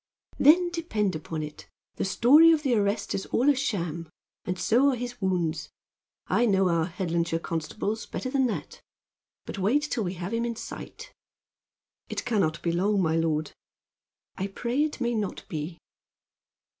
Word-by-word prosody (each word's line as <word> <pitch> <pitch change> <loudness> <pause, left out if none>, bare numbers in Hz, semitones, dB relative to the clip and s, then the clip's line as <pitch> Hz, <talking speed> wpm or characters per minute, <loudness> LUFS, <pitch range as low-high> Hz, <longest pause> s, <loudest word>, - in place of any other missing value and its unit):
"Then, 345 +5 +6
depend 220 - -1
upon 155 0 -4
it, 150 0 -9 0.3
the - - -1
story 285 +12 +6
of 310 -2 +2
the 265 -4 +2
arrest 205 -1 0
is 195 - -3
all 270 +5 +3
a - - +1
sham, 170 - -2 0.4
and 180 +1 -2
so 250 +9 +3
are 265 - +1
his 245 -1 -6
wounds. 180 -4 -1 0.6
I 240 - +2
know 190 -3 +3
our 165 -1 +1
Headlandshire 170 -2 -1
constables 205 +7 -3
better 255 - -4
than 265 -2 +2
that. 225 - -5 0.6
But - - -6
wait 235 +10 +2
till 260 -6 -1
we 180 0 -3
have 180 +4 -5
him 230 0 0
in 235 -1 -2
sight." - - -9 1.0
"It - - -4
can 220 -4 +2
not 160 -2 -1
be 170 - +1
long, 195 +4 +1
my 160 -3 +2
lord." 155 -2 0 0.9
"I 195 - -2
pray 240 +8 -1
it 305 -3 -3
may 240 -1 +1
not 210 -4 -3
be." 160 +1 -5
200 Hz, 170 wpm, -27 LUFS, 170-245 Hz, 1.0 s, Then